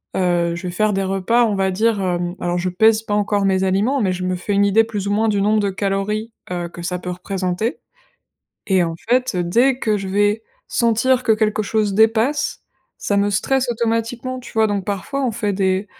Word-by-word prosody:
heu, 175 -2 +1
je 175 - -8
vais - - -3
faire 215 +3 +1
des 195 0 0
repas, 195 +6 +2
on 210 - 0
va 195 -1 +1
dire, 215 +1 +1
hem 175 -1 -2
alors 175 0 -1
je 185 +1 -1
pèse 220 +4 +3
pas 205 - -3
encore 205 -1 +1
mes 190 0 +2
aliments, 210 +8 +1
mais 190 - +1
je 185 0 -5
me 185 0 0
fais 200 +3 -3
une 200 0 +3
idée 210 +3 +4
plus 210 -3 -4
ou - - 0
moins 220 +2 +2
du 205 -1 +1
nombre 210 +2 +2
de 200 - 0
calories, 200 +3 -2 0.2
heu, 175 -1 -3
que 175 - -10
ça 180 +1 -3
peut 180 - -5
représenter 185 +4 -3 0.9
et 190 -3 +3
en 165 -1 -2 0.2
fait, 255 +1 +2
heu, 175 - 0
dès 245 +9 +2
que 215 -4 0
je 195 - -5
vais 205 +3 +1 0.3
sentir 235 +2 +2
que 230 -3 +3
quelque 215 0 +1
chose 210 -1 0
dépasse, 225 +7 +2 0.4
ça 205 - -1
me 200 - +2
stresse 255 +6 0
automatiquement, 235 +2 -2
tu - - -12
vois? 220 0 +4
Donc, 200 -3 -2
parfois, 205 +8 -3
on 250 - +1
fait 205 -1 -1
des 190 +1 0
205 Hz, 220 wpm, -20 LUFS, 190-225 Hz, 0.9 s, idée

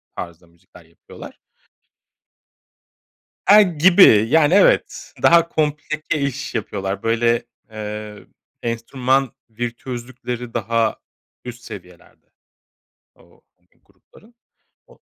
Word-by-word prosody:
tarzda 85 0 -9
müzikler 85 0 -21
yapıyorlar. 85 - -14 2.1
E, 210 +1 +8
gibi, 170 - +5
yani 160 +2 +4
evet. 200 - +2
Daha 170 0 +5
komplike 155 0 -2
iş 140 +1 -4
yapıyorlar. 100 -1 -4
Böyle, 115 +1 +1 0.3
ııı, 105 -1 -8 0.4
enstrüman 125 +3 -1 0.2
virtüözlükleri 120 +1 -6
daha 115 0 0 0.5
üst 120 -1 -9
seviyelerde 90 -3 -13 0.9
o - - -25 0.2
hani - - -41
o - - -37
grupların. 230 +2 -24 0.5
O - - -21
120 Hz, 90 wpm, -20 LUFS, 105-150 Hz, 2.1 s, E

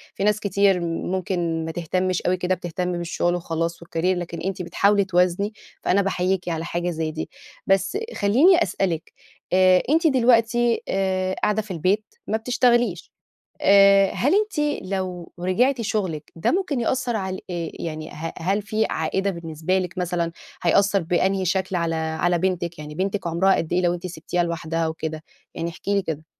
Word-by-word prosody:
في - - -3
ناس 210 +1 +3
كتير 200 -2 +2
ممكن 170 -1 -2
ما 160 - -3
تهتمش 180 +2 -1
أوي 185 +1 +1
كده 180 +1 0
بتهتم 180 +1 -3
بالشغل 175 0 -1
وخلاص 165 0 -3
والCareer، - - -20
لكن 175 -2 -1
أنتِ 190 0 -3
بتحاولي 200 +3 +2
توازني 185 +3 +1 0.3
فأنا 200 - +3
باحييكِ 185 -1 0
على 165 0 -2
حاجة 175 +1 -2
زي 160 -2 -2
دي، 160 - -5 0.4
بس 195 - +2 0.2
خلّيني 310 - +5
أسألِك، 170 -5 -2 0.4
آآ 185 -1 +5
أنتِ 325 +3 +4
دلوقتي 240 -3 +3
آآ 190 -1 0
قاعدة 210 +1 +2
في 205 -2 -10
البيت 185 +5 +1 0.2
ما 220 - +1
بتشتغليش، 240 -5 +1 0.5
آآ 195 0 +6
هل 285 +9 +2
أنتِ 305 -9 0
لو 185 -2 -4
رجعتِ 235 +8 +2
شغلِك، 190 -8 -2
ده 165 - +1
ممكن 345 -9 0
يأثّر 245 0 0
على 190 -2 -3
ال - - -9
آآ 170 -2 -3 0.2
يعني 155 0 -5
ه 165 +2 -6
هل 195 +5 0
في 215 +2 0
عائدة 195 +5 0
بالنسبة 165 +1 -2
لكِ 185 0 -4
مثلًا؟ 175 -2 -1 0.3
هيأثّر 195 +2 +3
بأنهي 190 +3 +1
شكل 190 +1 0
على 170 -1 0
على 160 +2 0
بنتِك؟ 175 -1 -1
يعني 150 0 -8
بنتِك 195 +3 -2
عمرها 170 +3 +3
قد 165 - -3
إيه 180 - +3
لو 175 -1 +2
أنتِ 175 +1 -6
سبتيها 175 0 -2
لوحدها 165 -1 -2
وكده؟ 160 -1 -5 0.3
يعني 170 +1 -3
احكي 200 +4 -3
لي 200 - +2
كده. 160 -2 -5
185 Hz, 170 wpm, -23 LUFS, 170-200 Hz, 0.5 s, آآ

